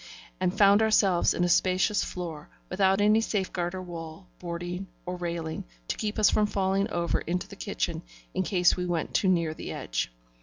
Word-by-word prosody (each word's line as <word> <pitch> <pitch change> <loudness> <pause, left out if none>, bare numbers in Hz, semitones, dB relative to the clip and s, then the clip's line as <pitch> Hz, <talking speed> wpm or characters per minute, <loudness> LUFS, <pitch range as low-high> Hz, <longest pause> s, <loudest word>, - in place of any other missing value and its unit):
and 185 0 0
found 200 +1 +6
ourselves 200 -5 +4
in 175 - 0
a - - +3
spacious 185 +3 +2
floor, 165 -4 -6 0.2
without 190 +1 +3
any 210 +2 +4
safeguard 190 -4 -2
or 185 - -5
wall, 165 0 -8
boarding, 175 +2 -5 0.2
or 180 0 -3
railing, 170 -2 -4 0.2
to - - -1
keep 210 -1 -3
us 215 -2 +5
from 210 -1 +3
falling 195 0 0
over 170 -1 0
into 180 +2 -3
the - - -11
kitchen - - -3 0.3
in - - 0
case 180 -1 +3
we 180 - -3
went 170 -2 -2
too 195 - +2
near 170 -3 +2
the - - -7
edge. - - -3
180 Hz, 185 wpm, -28 LUFS, 170-195 Hz, 0.3 s, found